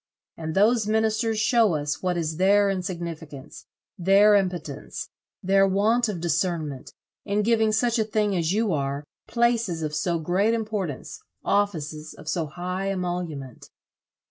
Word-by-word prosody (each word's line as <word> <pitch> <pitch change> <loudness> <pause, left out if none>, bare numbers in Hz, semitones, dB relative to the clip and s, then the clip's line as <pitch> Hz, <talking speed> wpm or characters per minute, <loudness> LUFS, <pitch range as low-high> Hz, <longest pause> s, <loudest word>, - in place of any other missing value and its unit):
And 160 -1 -5
those 215 +2 +3
ministers 220 +1 +1
show 220 -4 +3
us 145 -1 -2
what 180 -1 0
is 160 -2 -2
their 200 +2 +4
insignificance, 170 -6 -6 0.3
their 195 +4 +5
impotence, 180 -8 -2 0.3
their 195 +1 +4
want 220 +5 +2
of 190 -5 -3
discernment, 165 -4 -2 0.3
in 210 0 0
giving 220 -1 +3
such 235 +2 +1
a - - +3
thing 210 -2 0
as 170 -2 0
you 210 -1 +1
are, 140 0 -2 0.2
places 230 -7 +1
of 150 -1 -3
so 170 +3 0
great 185 +8 +1
importance, 210 - -4 0.2
offices 160 -7 -1
of 150 - -14
so 165 -1 -1
high 180 +5 -4
emolument." 175 -8 -4
185 Hz, 140 wpm, -25 LUFS, 160-215 Hz, 0.3 s, their